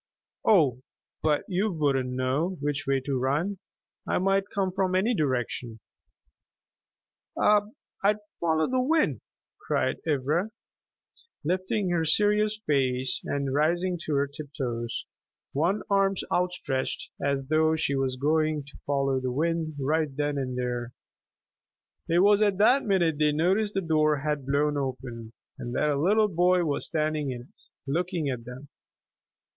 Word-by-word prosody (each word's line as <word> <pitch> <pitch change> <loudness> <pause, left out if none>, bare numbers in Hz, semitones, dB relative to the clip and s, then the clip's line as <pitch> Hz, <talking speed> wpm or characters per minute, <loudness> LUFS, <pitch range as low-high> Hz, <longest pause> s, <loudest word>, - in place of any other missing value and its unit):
"Oh, 145 - +4 0.4
but 150 -2 +1
you 200 +3 0
wouldn't 140 -6 0
know 130 +8 -1
which 145 +1 -2
way 135 -1 +2
to 135 0 -2
run. 155 +10 0 0.5
I - - +1
might 195 +1 +1
come 195 -2 -1
from 185 -1 0
any 210 +6 +2
direction." 125 - -2 1.6
"I'd 210 0 +1 0.2
follow 160 -2 +2
the 255 0 +1
wind," 310 +4 +1 0.4
cried - - 0
Ivra, 155 +7 +1 0.9
lifting 185 +3 0
her 170 -2 +1
serious 210 +5 +2
face 130 -3 +1
and 140 -2 -2
rising 175 +4 +1
to 150 - -1
her 140 0 +2
tiptoes, 135 -5 -5 0.5
one 170 +9 +1
arm 195 -1 +2 0.2
outstretched, 180 -7 -1
as 140 -1 0
though 155 0 +3
she 150 -3 0
were 135 -1 +1
going 155 +1 +1
to 145 - -15
follow 140 -2 +1
the 130 -1 -2
wind 160 +2 -1
right 150 0 0
then 145 0 0
and 130 -2 -3
there. 120 -1 -3 1.2
It 170 +2 +4
was 205 +1 +5
at 205 -3 +3
that 250 +7 +5
minute 175 -7 +2
they 150 -1 +4
noticed 195 +7 +1
the 195 - +1
door 155 -3 +2
had 145 -1 -2
blown 145 +1 +1
open, 125 -4 -5 0.3
and 120 0 -5
that 150 - +2
a 140 - 0
little 210 +5 +4
boy 180 -1 +2
was 145 -2 -1
standing 155 -2 -1
in 125 -2 -4
it, 120 - -20 0.2
looking 165 +1 -1
at 120 -3 -4
them. 125 +4 -9
155 Hz, 140 wpm, -27 LUFS, 135-185 Hz, 1.6 s, was